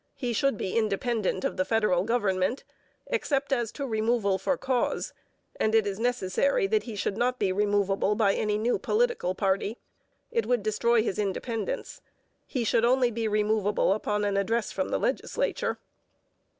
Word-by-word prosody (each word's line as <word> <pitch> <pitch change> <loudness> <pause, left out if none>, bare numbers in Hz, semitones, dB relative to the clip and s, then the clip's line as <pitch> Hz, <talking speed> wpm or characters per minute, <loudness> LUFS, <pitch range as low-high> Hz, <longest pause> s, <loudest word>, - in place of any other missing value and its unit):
He 245 -3 -2
should 275 0 +1
be 190 - -3
independent 215 -2 0
of - - -2
the 185 - +2
federal 200 -3 +2
government, 210 -1 0 0.4
except 285 - -1
as 240 -4 0
to 280 - -4
removal 220 -4 +1
for 265 +8 0
cause, 255 -2 -1 0.5
and 220 +1 +2
it 220 -2 +4
is 200 0 -3
necessary 245 - +1
that 430 +2 +1
he 230 - -6
should 200 0 -2
not 250 +2 +1
be 200 -5 +1
removable 200 0 +1
by 205 -3 +3
any 210 0 0
new 230 +3 0
political 460 - 0
party. 200 +3 0 0.5
It 460 -1 0
would 245 -4 +1
destroy 220 +2 +2
his 210 -2 -2
independence. 225 - -3 0.5
He 255 -4 -2
should 225 +1 +2
only 250 0 +3
be 225 0 -2
removable 210 -2 +2
upon 210 0 -1
an 200 -1 0
address 225 +3 0
from - - -2
the - - 0
legislature. - - -1
220 Hz, 165 wpm, -27 LUFS, 200-245 Hz, 0.5 s, it